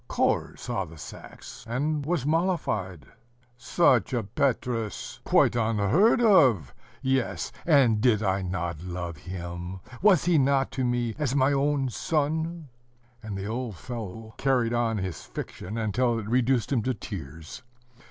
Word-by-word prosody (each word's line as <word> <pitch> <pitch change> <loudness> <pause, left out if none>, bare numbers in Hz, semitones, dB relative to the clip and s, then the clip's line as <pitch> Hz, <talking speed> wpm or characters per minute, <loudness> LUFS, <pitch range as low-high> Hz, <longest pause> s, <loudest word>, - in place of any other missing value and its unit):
Korzh - - 0
saw - - -2
the 80 0 -11
sacks, 75 - -10
and 145 +5 -1
was 150 -3 -1
mollified. 150 - -1 0.5
"Such 125 - +2
a 120 -3 0
Petrus, 115 -1 -2
quite - - +4
unheard 115 - +3
of! 130 - +5 0.3
yes, 130 -2 0 0.2
and 130 -9 +4
did 110 -3 +3
I 95 -1 +1
not 85 -3 -3
love 85 -2 -5
him? 90 +2 -6 0.2
Was 190 -6 +5
he 175 -3 +4
not 135 0 +2
to 130 - -2
me 120 -2 0
as 140 -3 0
my 140 +1 +3
own 140 -1 +1
son?" 160 +3 -1 0.5
And 105 -3 -5
the 95 - -5
old 115 0 -3
fellow 110 0 -7
carried 125 -4 +1
on 115 -2 +1
his 95 -6 -4
fiction 105 +5 -7
until 115 +2 +1
it 110 -2 -5
reduced 125 -1 +1
him 120 - +2
to 130 +3 -1
tears. 85 - -8
120 Hz, 145 wpm, -27 LUFS, 100-140 Hz, 0.5 s, of